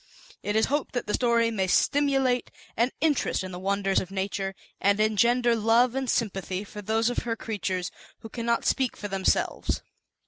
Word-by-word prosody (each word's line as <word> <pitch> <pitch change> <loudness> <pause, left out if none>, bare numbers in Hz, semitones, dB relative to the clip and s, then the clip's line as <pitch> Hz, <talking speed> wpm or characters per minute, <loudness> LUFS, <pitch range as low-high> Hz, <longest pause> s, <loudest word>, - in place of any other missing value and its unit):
It 205 - -2
is 220 - +4
hoped 290 +1 -2
that 245 - -1
the 210 - -3
story 235 -2 +2
may 190 -4 0
stimulate 270 +2 +2 0.3
an 235 +2 +2
in 315 -1 +4
terest 260 - -1
in 185 - -6
the 180 - -6
Wonders 195 0 +1
of 185 - -6
Nature, 195 0 -3 0.2
and 200 +1 +2
engender 235 +3 +3
love 230 +2 +3
and 265 -1 -2
sympathy 195 -3 -1
for 210 0 -9
those 220 +3 +1
of - - -1
Her 230 -1 -3
creatures 190 -5 -3 0.3
who 225 - -9
cannot 235 0 -1
speak 260 -3 +1
for 205 - -5
themselves. 195 -1 0
220 Hz, 180 wpm, -27 LUFS, 195-245 Hz, 0.3 s, is